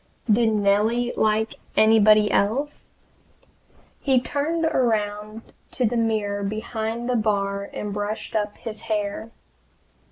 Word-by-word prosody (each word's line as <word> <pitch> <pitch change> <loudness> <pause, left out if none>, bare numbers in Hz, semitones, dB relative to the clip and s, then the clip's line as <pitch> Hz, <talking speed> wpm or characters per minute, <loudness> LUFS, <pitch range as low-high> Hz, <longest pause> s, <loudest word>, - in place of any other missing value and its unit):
Did 225 +1 +4
Nellie 215 +4 +1
like 220 +1 +1 0.2
anybody 215 -1 +5
else? 265 +9 -1 1.1
He 265 -2 +3
turned 310 +6 -1
around 215 -5 -1 0.2
to 255 - -1
the 235 - 0
mirror 215 -3 0
behind 220 +3 -3
the 250 - 0
bar 200 -2 -1
and 210 -1 -5
brushed 205 +2 -4
up 210 -1 -1
his 220 -2 -8
hair! 215 0 -3
220 Hz, 115 wpm, -23 LUFS, 205-235 Hz, 1.1 s, anybody